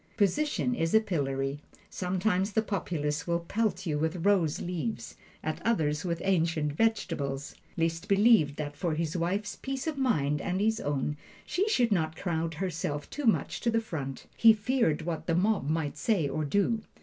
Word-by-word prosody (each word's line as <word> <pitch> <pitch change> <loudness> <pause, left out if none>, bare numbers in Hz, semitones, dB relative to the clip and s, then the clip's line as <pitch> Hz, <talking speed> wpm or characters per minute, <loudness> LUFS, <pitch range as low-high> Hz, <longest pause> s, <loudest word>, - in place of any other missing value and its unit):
Position 250 +5 +1
is 165 -4 0
a - - +9
pillory; 140 -8 -2 0.3
sometimes 190 +2 0
the 220 - +2
populace 155 -7 -2
will 170 0 +1
pelt 195 0 -1
you 150 -3 0
with 160 +3 -1
rose 180 -7 +3
leaves 180 +5 -4 0.3
at 155 - -3
others, 155 -10 +1
with 170 -2 -2
ancient 165 -5 +1
vegetables. 145 -9 -1 0.2
Liszt 165 +2 -1
believed 200 -8 +5
that 145 -1 -5
for 160 +1 -1
his 165 0 -2
wife's 195 +4 -1
peace 270 0 -4
of 310 -3 -2
mind, 150 - +1
and 185 0 -1
his 220 +2 +2
own, 145 +1 -1 0.3
she 395 +4 0
should 245 - +2
not 160 -5 +1
crowd 165 -2 -2
herself 150 -4 -3
too 295 - -4
much 225 - +1
to 235 - +1
the 230 0 +2
front 140 - -5
he 225 -1 +7
feared 215 - +1
what 165 -1 -4
the 165 - +2
mob 190 -5 +1
might 155 -2 -1
say 195 -10 +1
or 155 +2 -2
do. 205 +8 +1
175 Hz, 175 wpm, -29 LUFS, 155-215 Hz, 0.3 s, a